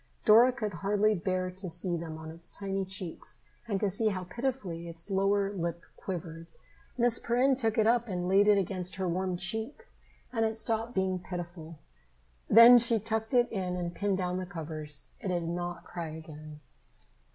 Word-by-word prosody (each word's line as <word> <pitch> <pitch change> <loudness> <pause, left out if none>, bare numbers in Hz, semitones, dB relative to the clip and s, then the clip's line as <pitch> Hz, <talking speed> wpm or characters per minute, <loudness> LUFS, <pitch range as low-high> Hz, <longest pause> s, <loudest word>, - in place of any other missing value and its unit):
Dora 230 +4 +7
could 215 -5 -4
hardly 205 +4 +1
bear 185 -1 -1
to 185 0 -7
see 175 +1 -1
them 165 -1 -5
on 160 0 -8
its 165 +1 -8
tiny 195 -1 -3
cheeks 190 -3 -5 0.2
and 200 -3 -1
to 205 - +1
see 200 +4 +1
how 190 -3 -1
pitifully 185 -5 -4
its 170 +4 -5
lower 195 +1 +2
lip 170 -2 -3
quivered. 165 -3 -6 0.5
Miss 240 -1 +4
Perrin 255 +3 +2
took 225 -4 0
it 220 - +4
up 235 +1 +3
and 180 -3 -3
laid 195 +2 +4
it 210 -1 +6
against 185 -1 -1
her 190 -1 -2
warm 180 +1 -1
cheek 220 - -3 0.5
and 225 -2 +1
it 220 0 0
stopped 225 +1 -1
being 190 -1 0
pitiful. 175 -3 -7 0.7
Then 235 +2 +10
she 235 0 +4
tucked 220 +3 -2
it 245 -1 +3
in 185 -4 -2
and 175 -1 -3
pinned 200 +1 0
down 180 -1 -2
the 185 - -5
covers. 155 -4 -4
It - - -6
did 175 -2 -1
not 175 0 -4
cry 170 -2 -6
again. 155 -1 -11
190 Hz, 180 wpm, -30 LUFS, 175-220 Hz, 0.7 s, Then